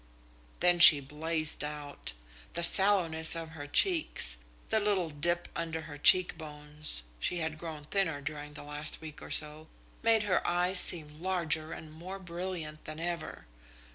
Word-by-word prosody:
Then 175 0 +2
she 160 -3 +11
blazed 155 +3 -4
out. 150 - -7 0.4
The 170 - -3
sallowness 170 -4 +6
of 165 -1 -6
her 155 -3 -10
cheeks, 310 - +2 0.3
the 220 - +1
little 200 -6 -2
dip 175 +4 -2
under 165 -1 -5
her 150 -2 -12
cheekbones 150 - 0 0.2
she 180 - -3
had 160 -2 -4
grown 155 -3 -9
thinner 165 -4 -2
during 150 +1 -8
the - - -9
last 150 +1 -2
week 155 -2 -11
or - - -11
so 155 +1 +1 0.3
made 225 -1 +2
her 205 -3 0
eyes 180 +2 +2
seem 155 -2 0
larger 165 -4 -2
and 155 -1 -10
more 180 +5 -9
brilliant 175 -4 -8
than 155 0 -8
ever. 170 0 -6
160 Hz, 150 wpm, -29 LUFS, 150-175 Hz, 0.4 s, she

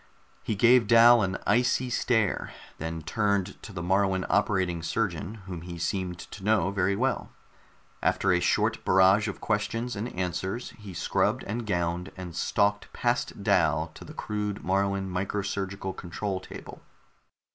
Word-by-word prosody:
He 110 - -2
gave 120 +2 +5
Dal 115 +1 +7
an 95 -1 -1
icy 125 +1 +2
stare, 110 -4 +1 0.3
then 80 0 -4
turned 100 +2 -1
to - - -9
the 90 -3 -5
Moruan 95 0 +1
operating 95 -4 +1
surgeon, 95 +2 -2
whom 90 -3 -6
he 85 0 -7
seemed 90 +1 -2
to 95 +3 -10
know 105 -1 +2
very 100 0 +1
well. 130 +6 -1 0.7
After 95 - +2
a 90 - +3
short 90 - +1
barrage 95 +3 +5
of 100 - -5
questions 115 +3 -1
and 110 +5 -3
answers, 95 +6 -3
he 100 -4 -11
scrubbed - - 0
and 110 +2 -4
gowned, 90 0 -1
and 90 -2 -7
stalked 105 +1 0
past - - -1
Dal - - +2
to - - -11
the - - -11
crude 105 -1 -3
Moruan 100 0 0
micro 95 +2 -2
surgical 95 -1 -3
control 95 +2 -4
table. 95 - -10
100 Hz, 150 wpm, -27 LUFS, 90-105 Hz, 0.7 s, Dal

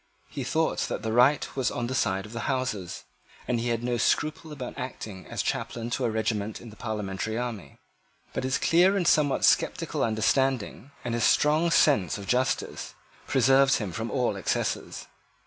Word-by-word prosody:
He - - -4
thought - - 0
that - - -4
the 110 0 -2
right 130 +5 +4
was 130 -2 +1
on 120 - -3
the 125 - -3
side 95 -6 0
of 105 - -11
the 115 - -3
Houses; 125 -9 -2 0.4
and 120 -2 0
he 120 - -2
had 115 0 -1
no 120 0 0
scruple 155 +6 0
about 130 -4 -6
acting 105 -7 -7
as - - -3
chaplain 115 0 -3
to 125 - -1
a - - +1
regiment 110 -1 -2
in 115 - -11
the - - -13
parliamentary 110 -1 -3
army: 115 - -5 0.6
but - - -2
his 130 -1 +1
clear 180 +8 +4
and 180 - 0
somewhat 145 -3 +3
sceptical - - +1
understanding, 120 +2 0 0.2
and 120 - -2
his 120 -1 0
strong 155 +3 +3
sense 135 - +3
of 100 - -8
justice, 125 +4 -1 0.3
preserved 135 +1 +4
him 105 -5 -3
from 110 +7 -4
all 125 -6 0
excesses. 95 - -2
120 Hz, 180 wpm, -27 LUFS, 110-135 Hz, 0.6 s, right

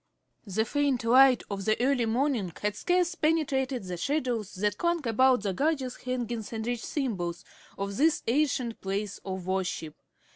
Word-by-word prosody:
The 220 +3 0
faint 280 -2 0
light 255 +2 +6
of 195 -1 -4
the 215 0 +2
early 250 -2 +2
morning 235 -5 0
had 210 0 0
scarce 355 - +1
penetrated 280 - 0
the 180 -1 -5
shadows 245 - -1
that 205 +1 -1
clung 340 -5 0
about 250 0 +4
the 200 -2 -1
gorgeous 270 - -1
hangings 240 -4 -4
and 220 -1 -4
rich 240 -1 -2
symbols 185 - -3 0.3
of 200 0 -4
this 315 +2 +3
ancient 250 -2 0
place 200 +1 -3
of 190 -2 -5
worship. 185 -4 -2
240 Hz, 155 wpm, -28 LUFS, 200-275 Hz, 0.3 s, light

